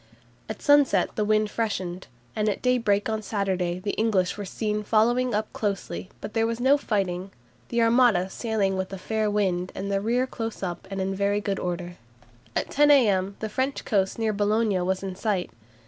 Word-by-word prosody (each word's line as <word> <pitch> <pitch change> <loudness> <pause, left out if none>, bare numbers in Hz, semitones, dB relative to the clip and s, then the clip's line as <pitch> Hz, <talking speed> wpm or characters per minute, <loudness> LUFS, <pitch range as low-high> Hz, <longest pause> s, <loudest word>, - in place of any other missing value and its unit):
At 220 - -6
sunset 290 -2 +4
the 215 - +1
wind 215 0 +2
freshened, 185 -5 -3 0.3
and 215 0 +1
at 200 - -3
daybreak 230 -5 +2
on 220 -1 -1
Saturday 190 -4 -1
the 200 +2 -3
English 200 -5 +1
were 205 - -5
seen 210 +2 -2
following 235 +3 +2
up 215 0 -2
closely, 200 -2 -3
but 210 - -6
there 225 0 +2
was 230 0 -3
no 265 +3 +5
fighting, 195 -8 -1 0.4
"the 235 -1 +2
Armada 230 -6 +4
sailing 200 -1 -1
with 190 0 -3
a 195 - -5
fair 215 +2 -1
wind 185 -3 0
and 200 +1 -4
the 195 0 +1
rear 240 +4 +1
close 225 -5 -5
up, 180 +1 -4
and 195 -1 -4
in 190 +1 -1
very 200 +1 +1
good 200 -1 -2
order." 175 0 -4 0.6
At - - -1
10 295 +1 +4
a.m. 200 -9 +4
the 220 - -1
French 260 +6 -2
coast 195 -3 +1
near 220 -1 0
Boulogne 205 -2 +1
was 190 +1 -1
in 190 -1 -4
sight. 195 -3 -1
210 Hz, 190 wpm, -26 LUFS, 190-225 Hz, 0.6 s, no